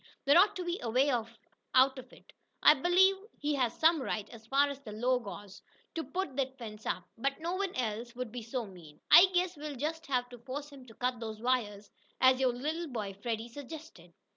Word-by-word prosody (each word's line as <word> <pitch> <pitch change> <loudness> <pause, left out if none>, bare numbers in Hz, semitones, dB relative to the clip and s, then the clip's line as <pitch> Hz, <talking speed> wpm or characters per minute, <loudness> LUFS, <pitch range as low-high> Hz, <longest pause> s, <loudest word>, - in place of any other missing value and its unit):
There 285 +2 +5
ought 400 +3 +4
to 360 - -4
be 345 +1 -2
a 235 - -3
way 260 +5 +3
out 250 +3 0
of 255 - -12
it. - - -18 0.3
I - - +9
believe 360 +6 +4 0.2
he 295 +1 -1
has 250 -5 0
the 320 +1 +6
right, 215 -5 -3
as 225 -1 -13
far 275 +3 +4
as 280 -1 -6
the 225 -7 -9
law 245 +4 +1
goes, 200 -3 -9 0.3
to 325 - -3
put 360 -7 -4
that 265 -1 -1
fence 220 -3 -8
up, - - -2 0.2
but 275 +4 -1
no 335 +2 -2
one 390 0 -2
else 235 0 -3
would 250 -2 -5
be 245 +1 -6
so 235 +2 -4
mean. 170 -6 -14
I 360 - +10
guess 360 0 +1
we'll 295 -1 -6
just 320 +5 -4
have 250 -3 0
to 245 - -11
force 280 +4 -6
him 265 -3 -13
to 225 - -14
cut 250 -1 -1
those 220 -2 -6
wires, 215 -4 -1 0.3
as 260 0 +5
your 260 -2 +3
little 310 +7 -3
boy, 215 -7 -4
Freddie, 225 +3 -4
suggested." 285 - -10
255 Hz, 215 wpm, -31 LUFS, 225-295 Hz, 0.3 s, I